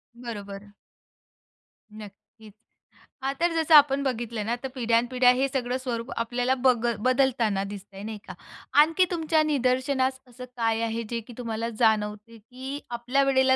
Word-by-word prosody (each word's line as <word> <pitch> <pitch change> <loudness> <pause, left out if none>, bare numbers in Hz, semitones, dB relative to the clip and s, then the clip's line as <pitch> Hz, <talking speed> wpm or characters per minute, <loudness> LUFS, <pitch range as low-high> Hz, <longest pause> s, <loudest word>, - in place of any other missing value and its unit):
बरोबर. 205 -4 -8 1.2
नक्कीच. 215 +1 -13 0.7
हां, 270 +1 0
तर 345 0 +2
जसं 320 0 +5
आपण 280 -1 +6
बघितलं 235 -4 -3
ना 235 +2 0
तर - - -2
पिढ्यानपिढ्या 245 +1 +2
हे 265 +2 +1
सगळं 255 -2 -2
स्वरूप 245 -1 -4
आपल्याला 245 +2 0
बगल 240 -2 +3
बदलताना 245 -6 +2
दिसतंय 200 0 -9
नाही 220 0 -5
का. - - -7 0.5
आणखी 325 +4 +3
तुमच्या 320 -2 +1
निदर्शनास 260 -2 0
असं 250 +1 -10
काय 225 -1 +1
आहे 230 0 -2
जे 235 - -2
की 245 - -10
तुम्हाला 230 -1 -3
जाणवते 215 0 0
की 260 +6 -8
आपल्या 245 +3 0
वेळेला 265 -1 +3
245 Hz, 140 wpm, -26 LUFS, 225-265 Hz, 1.2 s, आपण